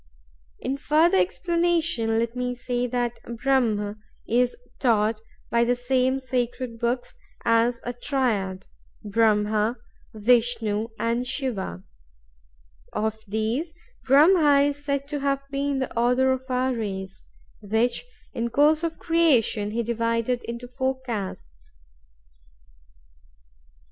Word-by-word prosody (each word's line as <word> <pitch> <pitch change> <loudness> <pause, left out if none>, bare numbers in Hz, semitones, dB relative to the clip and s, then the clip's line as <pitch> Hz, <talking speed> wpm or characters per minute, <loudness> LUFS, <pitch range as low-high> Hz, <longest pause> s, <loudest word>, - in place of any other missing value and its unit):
In 265 +2 -3
further 320 +6 +3
explanation 335 -11 +1
let 230 +1 -1
me 250 0 -2
say 245 0 -2
that 240 -1 -2 0.2
Brahm 215 -6 +1 0.3
is 245 - +1 0.2
taught, 220 -3 +2 0.3
by 235 0 +3
the 245 +1 +2
same 255 +1 +1
sacred 250 -2 -3
books, 245 +1 -1 0.3
as 230 +1 +3
a 245 - -3
Triad—Brahma, 215 -2 -1 0.4
Vishnu, 225 -1 +2
and 235 +2 -1
Shiva. 215 - -3 1.1
Of 220 +1 -2
these, 225 - -2 0.3
Brahma 290 +1 +5
is 290 0 -7
said 280 -1 -2
to 295 -1 -2
have 275 0 0
been 280 0 -1
the 260 -1 -3
author 250 +3 +3
of 260 0 -2
our 255 +1 +1
race; 195 -4 -5 0.4
which, 220 - 0 0.3
in 235 0 -2
course 300 +5 +4
of 330 -1 -2
creation, 270 -11 +2
he 230 +2 -1
divided 230 +1 0
into 235 +1 -6
four 260 +1 -2
castes. 185 - -7
245 Hz, 110 wpm, -25 LUFS, 225-270 Hz, 1.1 s, Brahma